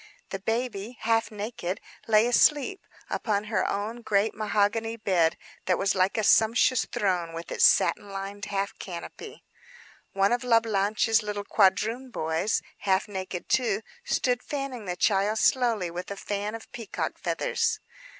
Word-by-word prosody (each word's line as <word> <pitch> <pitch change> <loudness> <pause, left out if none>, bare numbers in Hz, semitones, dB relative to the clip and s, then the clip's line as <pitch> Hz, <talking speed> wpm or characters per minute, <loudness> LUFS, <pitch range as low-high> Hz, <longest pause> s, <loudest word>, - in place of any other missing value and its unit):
The 195 - -3
baby, 225 +1 -3
half 225 0 +2
naked, 210 -3 -4 0.3
lay 215 0 +5
asleep 290 +8 +2 0.2
upon 205 -2 -1
her 215 0 0
own 215 +4 -3
great 210 -1 +1
mahogany 215 +2 0
bed, 175 -6 +2 0.3
that 180 -2 +2
was 195 - +1
like 190 +2 +1
a 220 - +1
sumptuous 230 +4 +4
throne, 180 -4 -1
with 165 +1 -7
its - - +4
satin 205 -1 +3
lined 195 +1 -6
half 200 0 -2
canopy. 170 -3 -8 0.7
One 195 +1 +2
of 240 +1 +1
La 235 -2 +5
Blanche's 220 +1 +1
little 205 -1 -4
quadroon 220 +7 +2
boys—half 190 +2 -1
naked 190 -3 -5
too—stood 245 +2 0
fanning 275 -7 -5
the 180 -1 -3
child 200 +3 +2
slowly 225 -8 +2
with 180 +1 -6
a 200 - -5
fan 205 +2 -3
of 225 - -11
peacock 230 -4 -4
feathers. 460 -2 0
210 Hz, 140 wpm, -27 LUFS, 195-230 Hz, 0.7 s, lay